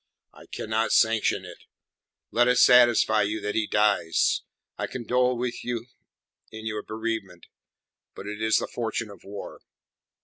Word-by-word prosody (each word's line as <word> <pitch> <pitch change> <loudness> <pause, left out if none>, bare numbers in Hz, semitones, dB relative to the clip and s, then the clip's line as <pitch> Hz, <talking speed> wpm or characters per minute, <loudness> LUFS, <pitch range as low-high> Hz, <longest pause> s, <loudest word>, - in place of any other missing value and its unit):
"I - - -16
cannot 110 +1 -2
sanction 110 -1 +2
it. - - -11 0.7
Let 120 +1 +3
it 125 0 +3
satisfy 120 -3 +5
you 105 +2 -1
that 105 0 -3
he 110 -1 0
dies. 100 -6 +2 0.3
I - - -3
condole 125 0 0
with 120 0 -4
you 120 -1 -3 0.6
in 110 0 -9
your 110 -1 -3
bereavement, 110 -6 -5 0.7
but - - -9
it 105 +1 -6
is 110 0 +3
the - - -1
fortune 115 -2 -4
of 100 - -15
war. 100 0 -9
110 Hz, 145 wpm, -26 LUFS, 105-120 Hz, 0.7 s, satisfy